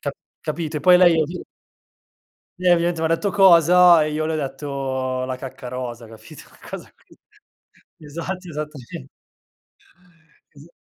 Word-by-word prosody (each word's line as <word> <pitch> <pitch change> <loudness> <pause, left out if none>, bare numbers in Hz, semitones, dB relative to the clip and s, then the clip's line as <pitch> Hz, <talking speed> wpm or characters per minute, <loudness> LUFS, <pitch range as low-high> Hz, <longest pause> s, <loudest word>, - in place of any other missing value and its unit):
Ca 140 - -3 0.3
capite? 155 -1 -4
Poi 180 +4 +6
lei 175 -2 +5 1.4
lei 180 -1 +3
ovviamente 170 -1 +1
m'ha 160 - 0
detto: 165 +5 0
"Cosa?" 180 -3 +6
E 155 - -3
io 155 +1 -2
le 160 - -2
ho - - -1
detto: 135 -2 -4
"La 130 0 -4
cacca 130 -1 -9
rosa", 120 -2 -6
capito? 110 0 -14 0.3
Cosa - - -9 1.1
esatto, 170 +5 -7
esattamente. 150 - -8 1.4
Es 145 +3 -17
155 Hz, 120 wpm, -21 LUFS, 135-170 Hz, 1.4 s, Poi